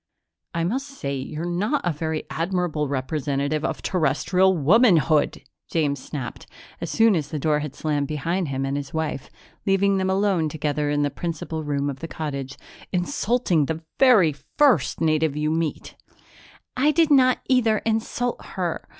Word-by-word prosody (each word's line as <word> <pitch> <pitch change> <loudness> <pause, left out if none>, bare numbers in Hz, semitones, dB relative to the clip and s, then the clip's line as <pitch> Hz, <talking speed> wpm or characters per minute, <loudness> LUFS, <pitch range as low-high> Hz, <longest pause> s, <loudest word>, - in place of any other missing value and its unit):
"I 165 - 0
must 260 +11 -1
say 140 - -5
you're 150 +5 -5
not 205 +12 0
a 175 - +1
very 160 +1 -3
admirable 165 -3 -1
representative 140 +2 -1
of - - -3
Terrestrial 180 +3 +2
womanhood!" 165 - +3 0.3
James 145 -5 0
snapped, 130 -5 -6 0.3
as - - -3
soon 225 -2 +4
as 155 -4 -1
the 155 - -4
door 150 +1 +1
had 150 -2 -6
slammed 145 -2 -1
behind 165 +4 -1
him 135 0 -2
and 135 +1 -2
his 145 +2 -5
wife, 160 -4 -3 0.3
leaving 195 0 +2
them 190 0 0
alone 190 -4 +1
together 150 -1 -1
in 145 0 +1
the 145 - 0
principal 165 -1 -4
room 145 -1 -1
of 135 -2 -4
the 165 - -5
cottage. 140 -4 -5 0.3
"Insulting 185 - +1
the 160 0 -4 0.2
very 215 - +6 0.2
first 285 -5 +3
native 155 -2 +1
you 150 +1 0
meet!" 160 -1 -2 0.8
"I 275 +4 +3
did 320 0 +3
not 255 -2 +5
either 230 -4 +3
insult 230 +2 -1
her. 180 -3 -4
160 Hz, 160 wpm, -24 LUFS, 145-195 Hz, 0.8 s, very